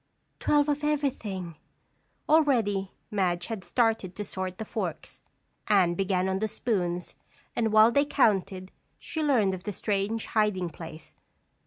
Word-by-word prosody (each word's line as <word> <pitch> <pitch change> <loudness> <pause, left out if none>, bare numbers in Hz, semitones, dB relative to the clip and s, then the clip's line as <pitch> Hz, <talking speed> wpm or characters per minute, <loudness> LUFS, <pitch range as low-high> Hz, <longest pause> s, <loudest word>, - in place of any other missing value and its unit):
"Twelve 295 -1 +3
of 295 0 -1
everything." 220 - -2 0.7
Already 230 -11 +3 0.2
Madge 180 -4 0
had 220 -3 -5
started 225 -7 0
to 210 - -4
sort 185 -2 -4
the 220 - -5
forks. - - -5 0.5
Anne 190 -5 +4
began 190 0 0
on 190 0 0
the 220 - 0
spoons 180 -6 -1 0.4
and 225 -2 +1
while 215 +2 +7
they 280 +3 +3
counted, 195 -8 +1 0.3
she 320 - -5
learned 240 -10 +3
of 185 0 -6
the 210 - -3
strange 205 +3 -1
hiding 205 -5 0
place. 160 0 -10
205 Hz, 140 wpm, -28 LUFS, 185-230 Hz, 0.7 s, while